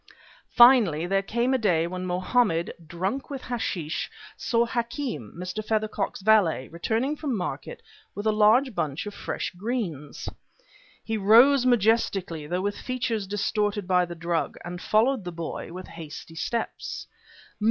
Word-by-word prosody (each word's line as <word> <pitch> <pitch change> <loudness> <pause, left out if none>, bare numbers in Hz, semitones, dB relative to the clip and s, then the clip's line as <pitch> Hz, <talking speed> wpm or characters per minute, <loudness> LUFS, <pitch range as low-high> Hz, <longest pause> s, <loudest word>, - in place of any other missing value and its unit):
Finally 230 - +7
there 195 +2 +1
came 235 +6 0
a 260 - +2
day 175 -7 +2
when 185 +1 -4
Mohammed, 180 -1 +1
drunk 190 - -3
with 275 -2 -6
hashish, 185 -10 -3 0.3
saw 235 0 +1
Hakem, 235 - -3
Mr. 185 +4 -4
Feathercock's 215 -2 -2
valet, 195 -11 +4
returning 225 - -1
from 285 -6 -2
market 145 -7 -5 0.3
with 205 +2 -5
a 215 - +4
large 220 +5 +4
bunch 145 -4 -2
of 205 - -6
fresh - - -4
greens. 180 - -4 0.8
He 220 -1 -2
rose 245 +6 +6
majestically, 200 -9 +1
though 180 +3 -1
with 205 +1 -2
features 235 -5 -2
distorted 205 0 -1
by 180 -1 +3
the 170 0 -8
drug, 170 0 -2
and 175 +1 -6
followed 225 +2 +2
the 175 - -5
boy 165 0 -6
with 185 +2 -7
hasty 165 -1 -9
steps. 230 +8 -3
205 Hz, 140 wpm, -26 LUFS, 175-235 Hz, 0.8 s, Finally